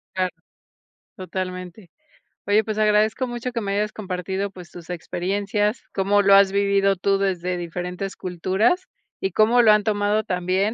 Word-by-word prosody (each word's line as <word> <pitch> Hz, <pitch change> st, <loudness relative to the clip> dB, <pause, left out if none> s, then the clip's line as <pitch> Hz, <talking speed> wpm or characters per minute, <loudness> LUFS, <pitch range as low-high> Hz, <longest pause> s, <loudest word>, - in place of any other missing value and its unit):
Claro. 185 Hz, -1 st, 0 dB, 0.9 s
Totalmente. 185 Hz, +1 st, -6 dB, 0.6 s
Oye, 210 Hz, +2 st, +3 dB
pues, 215 Hz, 0 st, -4 dB
agradezco 215 Hz, +3 st, +2 dB
mucho 240 Hz, +1 st, -4 dB
que 235 Hz, -1 st, -3 dB
me 200 Hz, -1 st, -2 dB
hayas 210 Hz, +1 st, 0 dB
compartido, 190 Hz, 0 st, -3 dB
pues, 180 Hz, -3 st, -12 dB
tus 175 Hz, -1 st, -12 dB
experiencias, 200 Hz, +5 st, -2 dB
cómo 200 Hz, +1 st, +2 dB
lo 200 Hz, 0 st, +5 dB
has 195 Hz, -1 st, +6 dB
vivido 200 Hz, 0 st, +2 dB
tú 195 Hz, +2 st, +1 dB
desde 180 Hz, -2 st, -1 dB
diferentes 180 Hz, +3 st, -5 dB
culturas 190 Hz, -, 0 dB, 0.3 s
y 190 Hz, -, -1 dB
cómo 225 Hz, +6 st, +4 dB
lo 220 Hz, -, +6 dB
han 210 Hz, 0 st, +4 dB
tomado 210 Hz, 0 st, +1 dB
también, 185 Hz, +3 st, 0 dB
195 Hz, 150 wpm, -23 LUFS, 185-210 Hz, 0.9 s, has